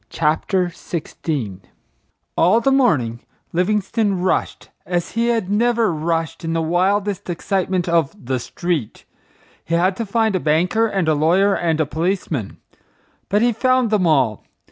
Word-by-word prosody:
CHAPTER 170 +4 0
XVI 150 - -5 0.8
All 185 +7 +4
the 270 +4 +1
morning 145 - +2 0.3
Livingstone 205 +3 +1
"rushed" 185 0 -1
as 175 -1 -2
he 230 +1 0
had 225 -5 0
never 230 -2 +2
"rushed" 165 +1 -2
in 165 0 -2
the 165 - 0
wildest 195 +3 0
excitement 185 +1 -1
of 170 -1 +1
"the 130 0 -1
street." 160 -2 -3 0.6
He 170 - -1
had 185 +3 +2
to 230 - -2
find 220 0 +1
a - - +1
banker 175 +9 +2
and 195 -6 -1
a 155 - +4
lawyer 175 +7 +3
and 165 -4 0
a 155 - +2
policeman. 160 - -2 0.7
But 205 +3 +2
he 240 0 +3
found 255 0 +2
them 195 -5 +2
all. 130 -9 +2
180 Hz, 145 wpm, -20 LUFS, 160-205 Hz, 0.8 s, All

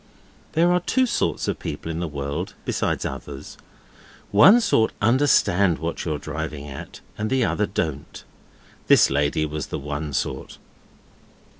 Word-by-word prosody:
There 170 +2 +3
are 180 - +3
two 260 +8 +1
sorts 235 - -1
of - - -2
people 80 +3 -5
in 80 - -4
the 85 - -2
world, 75 +4 -4
besides - - -1
others; 70 0 -7 0.8
one 190 - +8
sort 195 - +2
understand 100 - +3
what 85 +1 -4
you're 80 -3 -1
driving 75 -1 -5
at, 70 -2 -9 0.2
and 110 +1 -1
the 130 -2 +2
other 105 -2 0
don't. 75 -4 -4 0.6
This - - +6
lady 75 +2 +1
was 75 -1 -4
the - - -4
one 75 +1 -4
sort. - - -3
80 Hz, 145 wpm, -23 LUFS, 75-115 Hz, 0.8 s, one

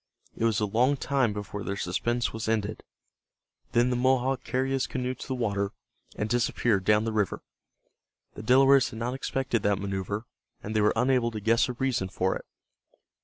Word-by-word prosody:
It 115 - -1
was 115 -1 +2
a 105 - +1
long 125 +7 +2
time 135 -4 +1
before 105 0 -5
their 100 - -3
suspense 115 +6 -1
was 110 0 -3
ended. 110 -1 -1 0.9
Then 120 +1 +3
the - - +1
Mohawk 130 +1 +1
carried 130 +2 -1
his 135 -1 0
canoe 125 -1 -2
to - - -9
the 130 - -2
water, 100 -4 -1 0.4
and 105 - -2
disappeared 115 -3 +1
down 105 +2 +4
the 115 - -1
river. 105 -4 -1 0.9
The - - -8
Delawares 135 +3 +5
had - - -9
not 120 +2 -2
expected 130 -3 -1
that 100 -1 +2
maneuver, 100 +2 -3 0.4
and 110 +2 -5
they 110 - +3
were 105 - +3
unable 125 -2 +2
to 110 -2 -5
guess 115 +5 +2
a - - -2
reason 125 -6 -1
for 95 0 0
it. - - -7
115 Hz, 185 wpm, -27 LUFS, 105-125 Hz, 0.9 s, Delawares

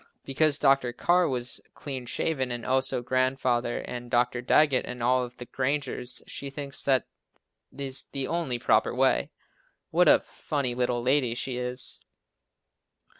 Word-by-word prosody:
Because 145 +2 +2
Dr. 135 -4 +3
Carr 175 +7 +3
was 125 -2 -3
clean 130 -4 -6
shaven 130 -1 -1
and 120 -1 -5
also 130 -1 0
Grandfather 130 -1 0
and 120 0 -7
Dr. 120 0 +1
Daggett, 135 +1 +3
and 125 -1 -6
all 130 +1 +3
of 125 0 -9
the 125 - -8
Grangers, 130 -2 -2
she 140 - -4
thinks 140 0 -4
that 130 -3 +2 0.7
is 135 -1 -1
the 135 -2 -3
only 165 -8 -1
proper - - +2
way. - - +2 0.6
What - - +4
a - - +7
funny 140 -5 -3
little 120 -1 -1
lady 130 -2 +2
she 125 0 -3
is! 125 0 +1
130 Hz, 145 wpm, -27 LUFS, 125-140 Hz, 0.7 s, a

